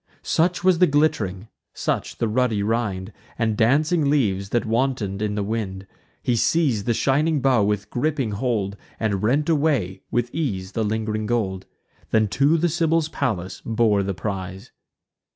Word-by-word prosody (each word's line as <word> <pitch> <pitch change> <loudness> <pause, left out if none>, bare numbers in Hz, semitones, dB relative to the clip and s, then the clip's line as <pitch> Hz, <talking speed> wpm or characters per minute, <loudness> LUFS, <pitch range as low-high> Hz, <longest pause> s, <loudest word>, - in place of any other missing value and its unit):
Such 175 +2 +1
was 185 -2 +4
the 180 - +6
glitt'ring; 115 -10 0 0.3
such - - -2
the 115 - 0
ruddy 110 -2 +1
rind, 105 -3 -2 0.2
And 110 -2 0
dancing 145 +7 +2
leaves, 100 -9 +1
that 120 +2 0
wanton'd 115 -4 -1
in 105 -1 -1
the 105 - -1
wind. 100 -3 -3 0.4
He 125 - +1
seiz'd 125 -4 +1
the 120 - +3
shining 150 +5 +2
bough 130 -4 +3
with 105 0 -1
griping 135 -3 -1
hold, 105 -3 -1 0.2
And 100 -4 0
rent 135 +8 +1
away, 145 - +1
with 120 0 -1
ease, 100 -12 -2
the 115 - -1
ling'ring 110 0 -2
gold; 95 -5 -1 0.4
Then 110 -1 +3
to 140 - +3
the 170 +2 +2
Sibyl's 165 -1 +1
palace 95 - -3
bore 110 -3 +2
the 100 -1 -2
prize. 95 -2 -5
115 Hz, 155 wpm, -23 LUFS, 100-140 Hz, 0.4 s, the